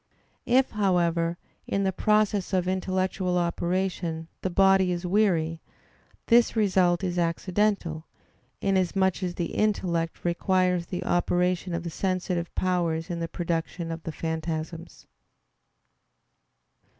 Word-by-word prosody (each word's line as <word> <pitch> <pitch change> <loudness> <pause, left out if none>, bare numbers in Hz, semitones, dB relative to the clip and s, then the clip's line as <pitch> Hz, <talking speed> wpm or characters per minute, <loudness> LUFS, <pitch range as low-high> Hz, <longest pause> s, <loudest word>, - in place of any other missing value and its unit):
If, 260 +2 +3
however, 170 -4 +1 0.3
in 200 - 0
the 190 - +1
process 210 -1 +1
of 180 -1 +1
intellectual 185 -1 0
operation 175 -1 -1
the 185 - -1
body 190 0 +4
is 175 0 -3
weary, 175 -5 +1 0.6
this 235 0 +4
result 185 -4 +2
is 180 -1 -1
accidental, 170 -1 0 0.5
inasmuch 190 -1 +1
as 180 -1 -2
the 170 -2 -3
intellect 175 -7 -1
requires 180 0 +1
the 180 - -4
operation 180 0 0
of 170 - -3
the 170 - -5
sensitive 180 -1 -2
powers 175 -2 0
in 170 - -3
the 165 - -2
production 170 0 -3
of 165 0 -5
the 165 - -5
phantasms. 160 +1 -5
180 Hz, 115 wpm, -26 LUFS, 170-190 Hz, 0.6 s, body